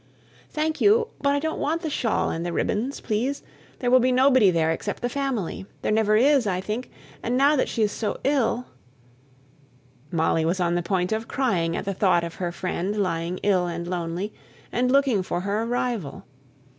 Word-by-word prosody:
"Thank 310 +1 -2
you. 450 +3 +4
But 280 0 +2
I - - +1
don't 315 +2 -3
want 325 +4 -1
the 315 - -1
shawl 230 -5 0
and 165 - -3
the 175 - -2
ribbons, 230 +10 -1
please: 245 +6 -1 0.3
there 245 -1 -1
will 255 - +7
be 255 +1 +2
nobody 255 -4 +5
there 165 -2 +2
except 165 - -4
the 245 - +1
family. 245 -9 -3 0.2
There - - 0
never 215 -1 +3
is, 270 -1 +4
I 185 -2 0
think; 215 +6 -4 0.3
and 245 +2 -1
now 285 +3 +5
that 265 - +1
she 225 - 0
is 210 - +1
so 215 - -3
ill" 255 -3 +1 1.4
Molly 160 0 +1
was 170 +4 0
on 175 -1 +1
the 175 - +1
point 180 +1 -1
of 220 +1 -2
crying 180 -11 0
at - - -4
the 200 - -1
thought 185 -3 +2
of 170 -1 -5
her 175 -2 -3
friend 185 +3 -3
lying 175 -2 -1
ill 185 -3 +2
and 170 0 -4
lonely, 175 +3 -3 0.4
and 250 +1 +1
looking 270 -7 +3
for 175 -1 -3
her 200 +3 -1
arrival. 235 - -2
215 Hz, 195 wpm, -24 LUFS, 180-255 Hz, 1.4 s, will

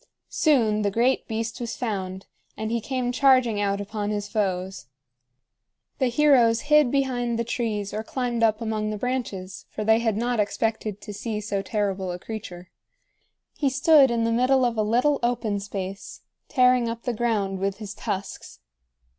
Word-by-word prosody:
Soon 230 -9 +2
the 205 - +1
great 240 +6 +1
beast 225 +1 -4
was 235 -1 -4
found, 190 -5 -4 0.3
and 220 0 -3
he 235 0 0
came 250 +1 -2
charging 255 -5 +3
out 200 0 0
upon 205 0 -4
his 205 -1 -2
foes. 190 - -2 1.1
The 260 - +2
heroes 245 -4 +4
hid 300 -3 +4
behind 245 -3 0
the 235 - 0
trees 220 -4 -3
or 215 - -2
climbed 240 0 -2
up 220 0 +2
among 215 -1 -2
the 215 - -3
branches, 210 -6 -4
for 215 - -5
they 220 +1 +4
had 225 -3 0
not 240 0 0
expected 210 0 -1
to 210 - -8
see 215 +1 -4
so 205 -1 -2
terrible 195 -3 -2
a 175 - -4
creature. 180 -3 -8 0.8
He 280 - +1
stood 275 +1 +5
in 235 -1 0
the 230 - +1
middle 255 +2 +3
of 240 -1 0
a 220 - +1
little 245 +7 +2
open 235 -4 0
space, 195 -1 -6 0.3
tearing 250 -3 +3
up 230 0 -6
the 245 - -1
ground 210 -4 -1
with 195 0 -1
his 210 -2 -7
tusks. 195 -1 -5
225 Hz, 170 wpm, -25 LUFS, 205-245 Hz, 1.1 s, stood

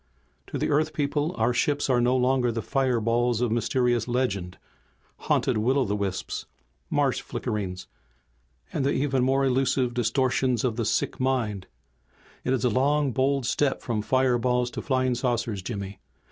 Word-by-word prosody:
"To - - -4
the - - -1
Earth 155 +1 +1
people 145 +1 0
our 115 +2 +2
ships 145 +4 +1
are 125 -3 +3
no 125 +2 +3
longer 125 -1 +2
the 115 -1 -3
fireballs 120 -3 +1
of 120 -2 0
mysterious 120 0 +1
legend, 105 -8 -1 0.6
haunted - - +1
will 125 +6 +2
o' 135 - +2
the 105 - -1
wisps, 100 -2 -3 0.4
marsh - - +1
flickerings 95 -4 -4 0.9
and - - 0
the 140 - +1
even 135 -2 +1
more 135 +1 +2
illusive 130 -1 +1
distortions 125 0 +1
of 120 -4 0
the 115 -1 -1
sick - - 0
in - - -1
mind. 115 -8 -1 0.8
It 125 - -1
is 130 -1 +1
a - - +4
long 140 +4 +2
bold 135 +1 +1
step 135 +2 0
from 115 -3 -1
fireballs 125 0 +1
to - - -5
flying 130 -2 +1
saucers, 120 -4 -1
Jimmy. 100 -1 -6
125 Hz, 160 wpm, -26 LUFS, 115-135 Hz, 0.9 s, a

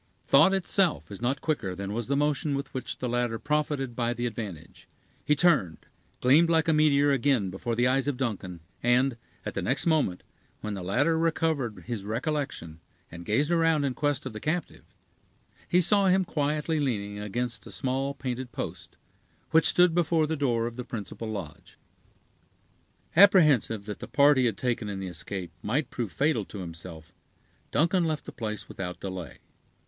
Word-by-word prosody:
Thought 150 +7 +6
itself 185 - +1
is 100 - -8
not 130 +3 -1
quicker 100 - -2
than 100 +2 -5
was 115 0 -3
the 140 - +1
motion 145 0 0
with 140 - -5
which 130 -2 -4
the 125 - -3
latter 120 -1 0
profited 145 -3 -1
by 120 0 -1
the 120 +1 -2
advantage; 105 -8 -7 0.4
he 150 - +3
turned, 140 - +2 0.4
gleamed 150 +7 +5
like 160 -1 +3
a 160 - +4
meteor 145 -2 +4
again 130 -7 +1
before 115 +5 -3
the 120 +2 +2
eyes 135 +2 +2
of 145 -3 -1
Duncan, 95 -9 -4 0.2
and, 125 +2 +3 0.3
at - - -4
the - - -2
next 135 +5 0
moment, 155 - +1 0.4
when 105 - -4
the 95 - -5
latter 145 - +1
recovered 155 - 0
his 110 -2 -4
recollection, 115 - -3 0.3
and 85 0 -10
gazed 140 +10 +1
around 165 -3 +3
in 135 -2 0
quest 145 0 -1
of 130 - -5
the 105 - -6
captive, 160 +8 -3 0.8
he 180 - +4
saw 200 +2 +4
him 190 0 +3
quietly 150 0 -1
leaning 105 -7 -2
against 110 0 -4
a - - -10
small 135 +2 -2
painted 130 -2 -4
post, - - -7 0.5
which 160 - +5
stood 180 -1 +5
before 165 -2 +2
the 160 +1 -2
door 120 -6 0
of 120 0 -5
the 125 - -4
principal 115 -1 -6
lodge. 95 -8 -8 1.4
Apprehensive 155 - +5
that 105 -1 -6
the - - -7
part 145 0 +5
he 130 - +3
had 110 -5 0
taken 120 -4 -2
in 100 -1 -4
the 95 - -4
escape 90 0 -6
might 135 +8 -1
prove 115 -6 -3
fatal 145 -6 +1
to 105 - -10
himself, 85 -2 -9 0.6
Duncan 170 +4 +2
left 155 -3 -2
the - - -7
place 110 -2 -5
without 90 -2 -6
delay. 95 -8 -6
130 Hz, 175 wpm, -27 LUFS, 105-150 Hz, 1.4 s, Thought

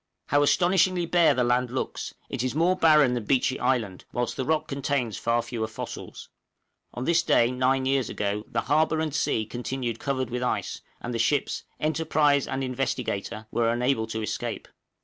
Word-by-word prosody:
How 145 +1 +4
astonishingly 180 +3 +3
bare 170 -4 +4
the 125 - +2
land 125 +1 +1
looks; 130 +2 -4
it - - -3
is 130 +2 -2
more 170 +4 +3
barren 150 -7 +5
than 120 -3 -3
Beechey 130 +2 +1
Island, 110 -8 0
whilst 120 0 -2
the 130 - -2
rock 160 +2 0
contains 135 -5 -1
far 115 +3 0
fewer 115 -2 -3
fossils! - - -8 0.7
On 125 - -3
this 170 0 +3
day 120 -6 +3
nine 130 +1 +1
years 135 -3 +1
ago 105 +1 -2
the - - -1
harbor 155 +1 +2
and 160 -2 -2
sea 110 -7 0
continued 120 0 -4
covered 130 -3 -2
with 125 0 -2
ice, 125 - -2 0.2
and 120 - -4
the 115 - -2
ships 140 +4 0
('Enterprise' 150 -2 +2
and 130 0 -2
'Investigator') 125 -5 -3
were 115 -1 +1
unable 120 -1 0
to 110 -1 -4
escape. 105 - -4
130 Hz, 175 wpm, -26 LUFS, 120-145 Hz, 0.7 s, barren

